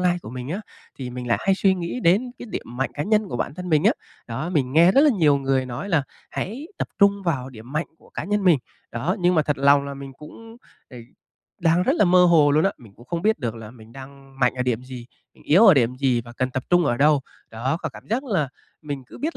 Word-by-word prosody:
lai 180 -1 +2
của - - -9
mình 125 +1 -7
á, 190 +7 -3 0.4
thì 125 -2 -5
mình 125 0 -6
lại 115 - +1
hay 195 - +2
suy 190 0 +2
nghĩ 175 +7 -4
đến 220 +7 +2
cái 245 - -8
điểm - - -4
mạnh 135 - -1
cá 145 - -2
nhân 210 +2 +1
của - - -4
bản 140 - -3
thân 180 +2 -7
mình 155 -1 +2
á. 220 - +5 0.3
Đó, 120 +9 -4
mình 135 -7 0
nghe 170 +5 +6
rất 275 - +5
là 300 0 +5
nhiều 155 - +3
người 135 -1 0
nói 125 +11 -6
là 160 -7 +2 0.3
hãy 245 +10 -5
tập - - -2
trung 200 -1 +4
vào 140 -8 -2
điểm 120 +1 -12
mạnh 155 +3 -1
của - - -22
cá - - -4
nhân 205 0 -1
mình. 170 -6 +5 0.3
Đó, 150 - -1
nhưng 180 +1 +3
mà 155 - +3
thật 145 -2 -2
lòng 140 0 +4
là 140 0 -6
mình 135 0 -9
cũng, 225 +9 -13 0.3
ờ, 125 - -11 0.6
đang 170 +1 +3
rất 265 - +2
là - - +4
mơ 180 0 +5
hồ 160 -4 +5
luôn 150 +2 +3
á, 195 - +2
mình 110 -5 -16
cũng 120 - -17
không 170 +4 -3
biết 220 +1 +2
được 120 -5 -3
là 110 -1 -9
mình 115 -2 -16
đang 135 0 -13
mạnh 125 0 +3
ở 125 - -2
điểm 125 -1 -1
gì, 125 -2 -9 0.3
mình - - -21
yếu 185 +10 +6
ở 190 - +8
điểm 125 -2 +1
gì 130 -3 +1
và 120 0 -12
cần 130 +1 -2
tập 130 0 -4
trung 175 -1 +4
ở 120 -5 +1
đâu. 145 +2 +4 0.3
Đó, 125 +6 -2
có - - -3
cảm - - -14
giác 250 +5 0
là 190 - 0 0.3
mình 145 -3 -5
cứ - - -13
biết 320 +3 -3
150 Hz, 270 wpm, -23 LUFS, 130-185 Hz, 0.6 s, ở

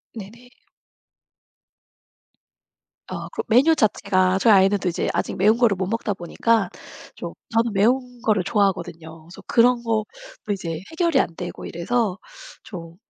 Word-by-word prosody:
네네. 230 +4 -11 2.6
어, - - -5
그러고 - - -4
메뉴 275 +8 +5
자체가 185 -5 +2
저희 220 0 +5
아이는 195 +1 +5
또 185 - -3
이제 170 - -1
아직 - - -2
매운 210 +4 +4
거를 235 -5 +3
못 185 0 -3
먹다 220 -1 -2
보니까 195 +3 0 0.5
좀 - - -7 0.2
저는 230 -1 +1
매운 245 +4 +1
거를 210 -6 +1
좋아하거든요. 170 -5 -2
그래서 175 +3 -13
그런 240 0 +3
것도 220 -2 0 0.5
이제 165 -4 -5
해결이 335 0 +2
안 165 - -1
되고 175 +1 -7
이래서 200 +3 -1 0.5
좀 170 -4 -9
205 Hz, 290 characters per minute, -22 LUFS, 180-235 Hz, 2.6 s, 메뉴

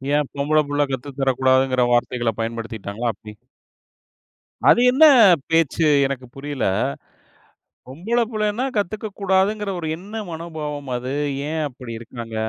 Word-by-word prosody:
ஏன்? 150 -2 +1
பொம்பளபுள்ள 145 0 +1
கத்து 135 +2 -4
தரக்கூடாதுங்கிற 130 -1 +2
வார்த்தைகள 120 -1 0
பயன்படுத்தீட்டாங்களா? 115 -1 -4
அப்படி. 105 0 -12 1.4
அது 240 - +6
என்ன 305 +5 +6 0.5
பேச்சு? 165 0 +2 0.2
எனக்கு 130 -2 -5
புரியல, 140 0 -4 1.2
பொம்பள 190 - -2
புள்ளைனா 215 +3 -1
கத்துக்க 215 +2 -2
கூடாதுங்குற 195 +2 +1
ஒரு 160 - -4
என்ன 200 +5 -13 0.2
மனோபாவம் 150 -4 -6
அது. 130 +3 -4 0.3
ஏன் 160 0 -2
அப்படி 125 -2 -10
இருக்காங்க? 115 -1 -8
145 Hz, 110 wpm, -21 LUFS, 125-175 Hz, 1.4 s, அது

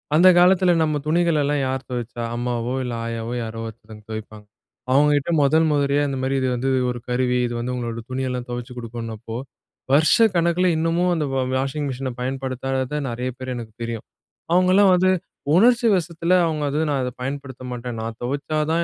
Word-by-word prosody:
அந்த 175 +4 +7
காலத்தில 180 0 +5
நம்ம 155 -1 0
துணிகளல்லாம் 155 -3 +2
யார் 130 0 -3
துவச்சா? 120 -1 -4
அம்மாவோ 120 0 -2
இல்லை 125 -2 -3
ஆயாவோ 115 0 -4
யாரோ 115 0 -6
ஒருத்தவங்க 110 -1 -12
துவைப்பாங்க. 110 -1 -7 0.5
அவுங்க 145 +3 +5
கிட்ட 145 +4 -2
மொதல் 160 +3 +4
முறையா 145 0 +2
இந்த 135 - -3
மாதிரி 135 +1 0
இது 130 - +1
வந்து 130 +2 -1 0.2
ஒரு 125 0 -3
கருவி. 125 0 +1
இது 120 - -5
வந்து 125 +1 -3
உங்களோட 115 -2 -4
துணி 130 +1 -2
எல்லாம் 125 0 -4
தொவச்சி 120 +1 -5
கொடுக்கும்ன்னப்போ, 115 -1 -6 0.6
வருஷக்கணக்கில 170 +2 +4
இன்னமும் 165 +3 +1
அந்த 155 - 0
வ 135 - 0 0.2
வாஷிங் 135 +2 -2
மிஷின 130 0 -3
பயன்படுத்தாத 130 +2 -2
நெறைய 125 +2 -3
பேர் 130 0 -5
எனக்கு 115 -3 -7
தெரியும். 115 -1 -5 0.5
அவங்கலாம் 185 +2 +5
வந்து, 185 +1 +3 0.4
உணர்ச்சி 235 +4 +5
வசத்தில 170 0 0
அவுங்க 155 -2 -1
வந்து 150 +3 0
நான் 140 -2 0
அத 125 - -2
பயன்படுத்த 135 -1 -5
மாட்டேன். 120 -1 -5
நான் 115 0 -5
துவைச்சா 140 +4 -2
தான் 170 +1 +2
130 Hz, 170 wpm, -22 LUFS, 120-155 Hz, 0.6 s, அந்த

